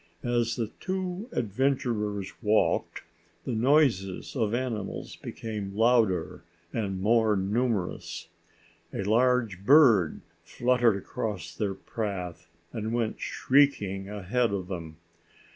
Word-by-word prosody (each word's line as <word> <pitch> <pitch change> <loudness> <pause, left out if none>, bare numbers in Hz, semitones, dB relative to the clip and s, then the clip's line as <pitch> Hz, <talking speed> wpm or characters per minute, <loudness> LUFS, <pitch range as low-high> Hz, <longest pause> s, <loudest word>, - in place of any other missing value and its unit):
As 120 -1 +1
the 115 -3 -3
two 190 +3 -3
adventurers 115 - -1
walked, 105 -1 +1 0.4
the - - -2
noises 120 -6 +2
of 110 -5 +1
animals 120 -6 -4
became 105 -3 -6
louder 110 -6 +2 0.3
and 100 -5 -2
more 110 +1 +3
numerous. 100 0 -2 0.6
A - - -3
large 115 -2 +2
bird 115 - +5 0.2
fluttered 120 -4 +2
across 95 -4 -5
their 95 +2 -2
path 95 -6 -5 0.2
and 110 +1 -2
went 115 -2 -1
shrieking 105 -9 +1
ahead 105 +3 0
of 95 -2 -3
them. 80 -4 -6
110 Hz, 105 wpm, -28 LUFS, 100-125 Hz, 0.6 s, bird